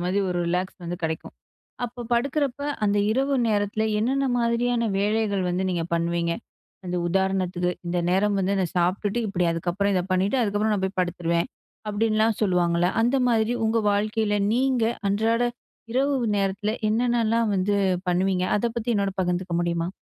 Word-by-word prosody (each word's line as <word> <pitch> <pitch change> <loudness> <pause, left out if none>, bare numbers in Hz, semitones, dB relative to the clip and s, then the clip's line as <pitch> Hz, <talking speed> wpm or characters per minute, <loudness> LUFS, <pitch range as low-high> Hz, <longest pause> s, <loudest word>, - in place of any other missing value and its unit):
மாதிரி 185 +3 0
ஒரு 175 - -1
ரிலாக்ஸ் 180 +2 -1
வந்து 175 +1 -4
கெடைக்கும். 160 -1 -3 0.5
அப்ப 240 0 -8
படுக்கிறப்ப 275 +2 0 0.2
அந்த 205 0 +2
இரவு 270 +4 +1 0.2
நேரத்துல 205 +1 0 0.2
என்னன்ன 270 +5 +1
மாதிரியான 235 -1 +1
வேலைகள் 205 -1 +1
வந்து 180 +2 -1
நீங்க 175 -2 -1
பண்ணுவீங்க? 170 0 0 0.5
அந்த 180 0 -2
உதாரணத்துக்கு 185 -1 0 0.2
இந்த 175 - -1
நேரம் 200 +3 +2
வந்து 195 +1 +1
அதை 190 - +1
சாப்பிட்டுட்டு 195 +6 0
இப்படி 180 -3 0
அதுக்கப்புறம் 180 +4 -1
இதை 180 -2 +1
பண்ணிட்டு, 190 +6 +2
அதுக்கப்புறம் 210 0 +1
நான் 195 -2 -1
போய் 190 0 -5
படுத்துருவேன். 170 -1 -1 0.4
அப்படின்லாம் 215 +1 +1
சொல்வாங்கல்ல. 175 -3 +2
அந்த 240 +4 +2
மாரி 230 -1 +2
உங்க 225 +1 +2
வாழ்க்கையில 210 +1 0 0.2
நீங்க 255 -1 +2 0.3
அன்றாட 225 +4 +1 0.5
இரவு 275 +3 +1 0.2
நேரத்தில 200 +2 0 0.2
என்னன்னலாம் 230 0 +1
வந்து 195 +2 +1 0.3
பண்ணுவீங்க? 185 +1 +1
அதை 235 - 0
பத்தி 235 +1 -3
என்னோடு 200 -1 0
பகிர்ந்துக்க 180 0 -1
முடியுமா? 170 0 -1
200 Hz, 145 wpm, -25 LUFS, 180-225 Hz, 0.5 s, அந்த